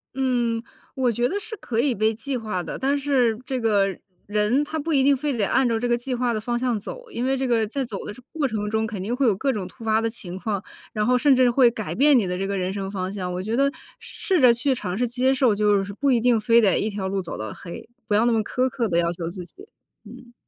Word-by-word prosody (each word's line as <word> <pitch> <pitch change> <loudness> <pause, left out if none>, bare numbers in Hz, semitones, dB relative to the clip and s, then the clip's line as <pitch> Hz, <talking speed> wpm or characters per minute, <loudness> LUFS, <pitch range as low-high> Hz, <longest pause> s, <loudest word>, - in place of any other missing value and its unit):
嗯， 240 -3 0 0.3
我 255 -2 +1
觉 240 +2 +1
得 400 +8 -2
是 440 +2 -6
可 230 - -3
以 265 +1 +2
被 220 +1 +1
计 260 +4 -3
划 215 -6 -3
的， - - -5
但 275 +2 +1
是 260 -6 +1
这 260 0 -2
个 200 -4 +1 0.3
人 210 +7 +1
他 315 +2 -4
不 320 +3 -3
一 270 -2 +4
定 280 +1 +5
非 280 0 -2
得 210 - +1
按 265 -1 +2
照 230 -1 0
这 245 - -1
个 240 0 +2
计 250 +1 -3
划 245 -1 0
的 215 - -1
方 240 +2 -1
向 245 -3 0
走， - - -9
因 240 - -3
为 270 +1 +1
这 265 0 -1
个 230 -3 +2
在 270 +5 -2
走 215 -5 -6
的 - - -6 0.2
过 310 -4 0
程 210 -3 -3
中 220 +1 0
肯 210 -4 -5
定 230 +5 -2
会 270 +1 +1
有 210 - +3
各 270 +8 0
种 200 -5 -4
突 230 +6 -14
发 220 0 +2
的 225 - 0
情 185 -6 -6
况， 200 0 -3 0.3
然 210 -1 0
后 250 +2 +3
甚 275 +1 +4
至 255 -1 +4
会 245 0 +5
改 220 -2 -5
变 285 0 +5
你 225 - +2
的 180 0 -2
这 195 +1 -2
个 200 0 -2
人 185 0 -2
生 195 -1 -4
方 185 -2 -3
向， 185 -3 -4
我 180 - -3
觉 220 +3 -2
得 275 +2 +3 0.3
试 370 -5 -1
着 250 -2 +7
去 255 +4 +1
尝 185 -7 -4
试 245 +2 +1
接 250 +3 +1
受， 255 -4 +3
就 205 -1 +2
是 200 +1 -7
不 275 +6 +1
一 245 - +4
定 240 -1 +3
非 230 +2 +4
得 200 -4 +3
1 215 - 0
条 200 -2 -4
路 195 0 -1
走 175 - -7
到 110 -1 -5
黑， 170 - -9 0.2
不 205 - +1
要 220 +3 +4
那 240 - +3
么 225 - +2
苛 255 +4 0
刻 240 -2 -1
地 170 -4 0
要 170 0 +2
求 170 -1 -5
自 180 0 -8
己。 385 - -16 0.4
嗯。 240 -1 -13
230 Hz, 300 characters per minute, -23 LUFS, 205-260 Hz, 0.4 s, 着